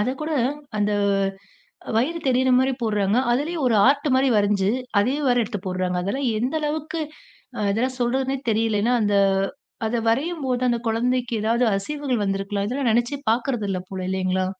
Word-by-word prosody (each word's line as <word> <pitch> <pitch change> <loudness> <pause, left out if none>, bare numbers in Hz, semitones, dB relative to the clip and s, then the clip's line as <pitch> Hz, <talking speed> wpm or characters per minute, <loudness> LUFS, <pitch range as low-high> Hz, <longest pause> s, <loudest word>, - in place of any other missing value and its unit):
அத 210 - +1
கூட 315 +1 -3 0.5
அந்த 210 0 +1 1.0
வயிறு 295 +9 +1
தெரியற 260 0 +2
மாதிரி 260 +1 +2
போடுறாங்க. 210 -2 +1 0.2
அதுலயும் 300 +4 -1
ஒரு 240 - +3
ஆர்ட் 285 +2 +3
மாரி 265 +1 +3
வரஞ்சு, 200 -1 +2 0.3
அதே 245 +6 +1
வேற 245 -1 +3
எடுத்துப் 205 -3 -5
போடுறாங்க. 185 -1 -1
அதெல்லாம் 250 +8 -1
எந்த 250 +6 -1
அளவுக்கு 310 +2 -3 0.7
இதெல்லாம் 255 +5 -1
சொல்றதுனே 265 +2 0
தெரியல. 220 -1 +1
ஏன்னா 240 +2 +2
அந்த 205 -1 +2 0.7
அத 225 +2 -1
வரையும் 300 +8 0
போது 250 -1 -1
அந்தக் 235 -1 -1
கொழந்தைக்கு 245 +2 0
ஏதாவது 230 +3 +2
அசைவுகள் 260 +2 -2
வந்திருக்கலாம். 195 +1 -2
இதெல்லாம் 255 0 0
நினைச்சே 240 +5 0
பாக்கிறதில்ல 225 -5 -1
போல. 190 -1 -5
இல்லைங்களா? 185 0 0
240 Hz, 150 wpm, -23 LUFS, 205-265 Hz, 1.0 s, ஒரு